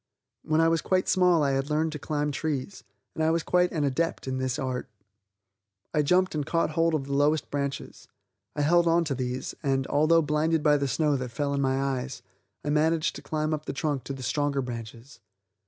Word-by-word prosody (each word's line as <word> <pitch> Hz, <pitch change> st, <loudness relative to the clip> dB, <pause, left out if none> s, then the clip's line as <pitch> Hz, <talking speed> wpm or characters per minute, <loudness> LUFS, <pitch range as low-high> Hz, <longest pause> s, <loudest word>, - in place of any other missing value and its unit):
When 155 Hz, +1 st, 0 dB
I 165 Hz, -, +4 dB
was 165 Hz, 0 st, +2 dB
quite 185 Hz, -1 st, +1 dB
small 180 Hz, -4 st, +4 dB
I 140 Hz, -, +2 dB
had 135 Hz, +2 st, -1 dB
learned 155 Hz, +1 st, +1 dB
to 150 Hz, -, -6 dB
climb 150 Hz, 0 st, -2 dB
trees, 145 Hz, +4 st, -3 dB, 0.3 s
and 160 Hz, -, -2 dB
I 160 Hz, -, +3 dB
was 165 Hz, 0 st, +1 dB
quite 180 Hz, 0 st, +2 dB
an 155 Hz, -3 st, -1 dB
adept 145 Hz, +2 st, -1 dB
in 130 Hz, 0 st, -2 dB
this 130 Hz, -1 st, -1 dB
art. 130 Hz, -1 st, -3 dB, 1.0 s
I 150 Hz, -, +3 dB
jumped 180 Hz, +5 st, +2 dB
and 150 Hz, -2 st, -1 dB
caught 165 Hz, +1 st, 0 dB
hold 165 Hz, +1 st, +2 dB
of 140 Hz, -3 st, -2 dB
the 140 Hz, -, -4 dB
lowest 145 Hz, +2 st, +1 dB
branches. 140 Hz, -1 st, -4 dB, 0.5 s
I 145 Hz, -, 0 dB
held 170 Hz, +3 st, +4 dB
onto 165 Hz, -3 st, +2 dB
these, 130 Hz, 0 st, -3 dB
and, 135 Hz, -1 st, 0 dB
although 155 Hz, +4 st, +3 dB
blinded 150 Hz, +1 st, +1 dB
by 150 Hz, -1 st, +5 dB
the 140 Hz, -1 st, -1 dB
snow 150 Hz, +1 st, +1 dB
that 125 Hz, -1 st, -4 dB
fell 140 Hz, +4 st, -2 dB
in 140 Hz, -, 0 dB
my 135 Hz, 0 st, +1 dB
eyes, 135 Hz, -1 st, -3 dB, 0.4 s
I 145 Hz, -, 0 dB
managed 155 Hz, +1 st, +1 dB
to -, -, -9 dB
climb 155 Hz, +1 st, -2 dB
up 155 Hz, 0 st, -4 dB
the -, -, -2 dB
trunk 140 Hz, -1 st, -2 dB
to 140 Hz, -, -4 dB
the 135 Hz, -1 st, -8 dB
stronger 140 Hz, +2 st, 0 dB
branches. 115 Hz, +1 st, -8 dB
145 Hz, 210 wpm, -27 LUFS, 135-160 Hz, 1.0 s, by